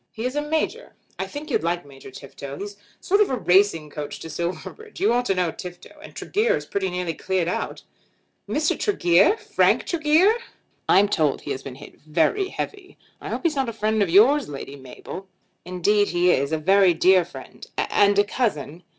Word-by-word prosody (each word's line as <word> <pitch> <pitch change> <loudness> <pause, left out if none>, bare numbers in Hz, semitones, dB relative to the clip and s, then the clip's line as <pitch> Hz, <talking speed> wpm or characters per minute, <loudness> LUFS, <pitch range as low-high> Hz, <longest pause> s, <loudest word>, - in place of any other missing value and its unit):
"He 225 - -6
is 255 +2 -2
a 295 - +1
major. 310 +1 -2 0.3
I - - -2
think 295 +1 -8
you'd - - +1
like 170 +1 -2
Major 135 -1 -13
Tifto. 140 +1 -9
He's 205 +1 -6
a - - -27 0.2
sort 400 +3 +2
of 255 - 0
racing 180 -5 +3
coach 150 -1 -6
to 160 - -7
Silverbridge. 185 - -6
You 385 - +3
ought 245 +1 +1
to 195 - +1
know 180 -3 0
Tifto. 175 +1 -10
And - - -13
Tregear 445 +3 0
is - - -7
pretty 195 -1 -2
nearly 180 -2 -3
cleared 185 0 -1
out." 180 - -3 0.7
"Mr. 305 +1 +1
Tregear! 195 - +3
Frank - - +2
Tregear!" 330 +5 +3 0.6
"I'm 200 +2 +5
told 155 -8 0
he - - -6
has 130 - -4
been 135 -2 -8
hit 145 +2 -14
very 165 - +1
heavy. 390 0 -7 0.2
I - - -7
hope - - -3
he's 330 -3 +1
not 265 -3 0
a - - -6
friend 215 0 0
of 195 - +2
yours, 240 - +5
Lady 140 0 -7
Mabel." 140 +8 -10 0.4
"Indeed 200 +3 +1
he 175 +1 +2
is; 140 0 0
a 160 - +1
very 190 +2 +4
dear 185 +2 +5
friend 175 - -12
and 205 0 +2
a 205 - +6
cousin." 190 - -2
190 Hz, 195 wpm, -23 LUFS, 165-260 Hz, 0.7 s, a